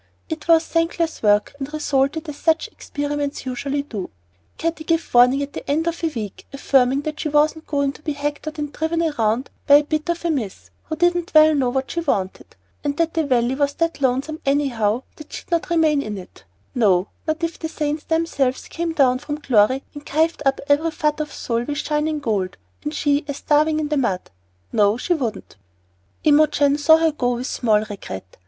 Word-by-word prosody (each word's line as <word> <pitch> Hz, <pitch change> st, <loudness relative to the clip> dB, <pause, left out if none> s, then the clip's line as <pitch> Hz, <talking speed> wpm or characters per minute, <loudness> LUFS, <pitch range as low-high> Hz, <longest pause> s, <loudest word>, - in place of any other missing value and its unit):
It 320 Hz, -1 st, -5 dB
was 330 Hz, -1 st, +5 dB
thankless 330 Hz, 0 st, -1 dB
work 205 Hz, -1 st, +3 dB
and 275 Hz, +1 st, -5 dB
resulted 300 Hz, +1 st, 0 dB
as 300 Hz, -, -5 dB
such 320 Hz, +1 st, +1 dB
experiments 290 Hz, -1 st, -4 dB
usually 275 Hz, +3 st, -2 dB
do. 215 Hz, -10 st, -6 dB, 0.5 s
Katty 330 Hz, -1 st, -2 dB
gave 330 Hz, +1 st, -1 dB
warning 250 Hz, +3 st, +5 dB
at 285 Hz, -, -7 dB
the -, -, -7 dB
end 310 Hz, +3 st, +1 dB
of 335 Hz, 0 st, -3 dB
a -, -, +3 dB
week, 215 Hz, -9 st, -7 dB
affirming 270 Hz, -1 st, +2 dB
that 305 Hz, 0 st, -5 dB
she 305 Hz, -, -2 dB
wasn't 305 Hz, +2 st, +2 dB
going 280 Hz, -2 st, 0 dB
to -, -, -16 dB
be 305 Hz, -1 st, -2 dB
hectored 295 Hz, +2 st, -4 dB
and 295 Hz, -1 st, -4 dB
driven 325 Hz, +1 st, -1 dB, 0.2 s
round 225 Hz, +4 st, +1 dB, 0.2 s
by 285 Hz, -, +8 dB
a 295 Hz, -, +6 dB
bit 310 Hz, +2 st, -2 dB
of 340 Hz, 0 st, -2 dB
a 340 Hz, -, +2 dB
miss, 230 Hz, -11 st, -4 dB
who 315 Hz, -, -4 dB
didn't 350 Hz, 0 st, +1 dB
well 310 Hz, 0 st, +8 dB
know 270 Hz, -4 st, +1 dB
what 265 Hz, +1 st, -2 dB
she 340 Hz, -, -2 dB
wanted; 195 Hz, -, -2 dB, 0.3 s
and 290 Hz, 0 st, -2 dB
that 330 Hz, -1 st, +1 dB
the 325 Hz, -, +1 dB
Valley 245 Hz, -1 st, +2 dB
was 285 Hz, +1 st, 0 dB
that 330 Hz, -3 st, -1 dB
lonesome 270 Hz, +4 st, 0 dB
anyhow 255 Hz, -5 st, +1 dB
that 305 Hz, -, -12 dB
she'd -, -, -9 dB
not 335 Hz, 0 st, 0 dB
remain 315 Hz, -4 st, +3 dB
in 210 Hz, -5 st, -5 dB
it; 185 Hz, -, -12 dB, 0.3 s
no, 200 Hz, -7 st, +2 dB, 0.2 s
not 315 Hz, +2 st, -1 dB
if 335 Hz, 0 st, -2 dB
the 320 Hz, -, -4 dB
Saints 300 Hz, -1 st, -2 dB
themselves 320 Hz, -6 st, 0 dB
came 335 Hz, -1 st, -3 dB
down 255 Hz, -4 st, +3 dB
from 295 Hz, +1 st, -5 dB
glory 260 Hz, -1 st, +3 dB
and 290 Hz, -1 st, -9 dB
kivered 320 Hz, +2 st, +1 dB
up 270 Hz, -, +2 dB
every 290 Hz, +3 st, +3 dB
fut 305 Hz, -1 st, -1 dB
of 300 Hz, -1 st, -3 dB
soil 235 Hz, 0 st, -2 dB
with 290 Hz, +1 st, -3 dB
shining 305 Hz, +1 st, -1 dB
gold, 200 Hz, -9 st, -2 dB, 0.3 s
and 150 Hz, -, -4 dB
she 290 Hz, 0 st, +1 dB
a 285 Hz, -, -3 dB
starving 305 Hz, +2 st, +2 dB
in 300 Hz, -1 st, -2 dB
the 300 Hz, -, 0 dB
mud, 195 Hz, -9 st, -1 dB, 0.4 s
that 205 Hz, +1 st, +3 dB
she 355 Hz, -, +1 dB
wouldn't! 245 Hz, -, -4 dB, 0.7 s
Imogen 295 Hz, -1 st, +4 dB
saw 320 Hz, +2 st, +6 dB
her 325 Hz, 0 st, +2 dB
go 245 Hz, -4 st, 0 dB
with 245 Hz, +2 st, -4 dB
small 220 Hz, -5 st, +2 dB
regret. 95 Hz, -, -8 dB
290 Hz, 200 wpm, -21 LUFS, 255-315 Hz, 0.7 s, by